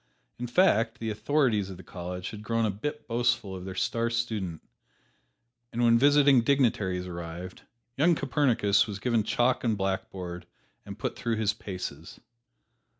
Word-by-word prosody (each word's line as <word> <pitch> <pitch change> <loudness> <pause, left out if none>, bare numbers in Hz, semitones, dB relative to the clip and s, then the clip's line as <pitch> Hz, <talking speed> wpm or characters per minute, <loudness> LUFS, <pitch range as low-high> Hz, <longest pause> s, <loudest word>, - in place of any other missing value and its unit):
In 125 - -3
fact 115 - +3
the 115 -1 -3
authorities 110 -3 +1
of 95 - -8
the 95 - -12
college 90 0 -6
had 105 - -8
grown 115 +1 0
a 105 - +1
bit 150 +10 -5
boastful 120 -5 0
of 90 0 -7
their 95 -1 -6
star 115 +4 0
student, 110 -8 -3 1.1
and 120 +1 -1
when 115 0 +5
visiting 140 -1 +6
dignitaries 110 -9 +1
arrived, 85 +1 -7 0.4
young 165 +5 +4
Copernicus 120 -8 +2
was 100 -2 -5
given 115 +2 +1
chalk 120 +4 +1
and 115 -4 +1
blackboard 90 -2 -4 0.4
and - - -7
put - - -3
through 115 -1 -1
his 110 -2 +1
paces. 90 -7 -7
110 Hz, 150 wpm, -28 LUFS, 95-120 Hz, 1.1 s, visiting